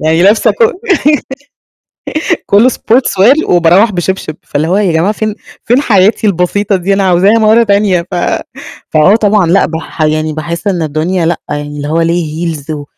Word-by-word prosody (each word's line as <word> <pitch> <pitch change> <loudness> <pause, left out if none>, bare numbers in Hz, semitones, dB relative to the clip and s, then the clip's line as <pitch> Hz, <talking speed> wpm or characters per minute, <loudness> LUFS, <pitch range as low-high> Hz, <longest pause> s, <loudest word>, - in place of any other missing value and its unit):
يعني 160 +2 +1
لابسة 205 +4 +3
كو 465 -1 +1 1.7
كُلّه 215 +5 +4
sportswear 245 +2 +2
وباروّح 175 +5 +3
بشبشب، 180 -3 -3
فاللي 150 +2 -2
هو 185 - +1
يا 200 -4 +1
جماعة 165 +5 +1
فين 215 0 -3 0.3
فين 245 +4 +2
حياتي 210 -3 +2
البسيطة 195 +2 0
دي؟ 190 +2 -1
أنا 195 0 0
عاوزاها 190 +5 +3
مرة 220 +2 +4
تانية، 200 -4 +1
ف - - -3 0.7
فأه 155 +7 +3
طبعًا 210 -4 +1
لأ 185 +4 +3
باح 160 0 -6
يعني 155 0 0
باحس 170 +5 -5
إن 180 -4 -1
الدنيا 160 +3 -2
لأ، 170 0 -1
يعني 145 0 -4
اللي 145 0 -5
هو 160 +2 0
ليه 165 0 -2
heels 145 0 -12
و 150 -2 -4
180 Hz, 165 wpm, -11 LUFS, 160-205 Hz, 1.7 s, كُلّه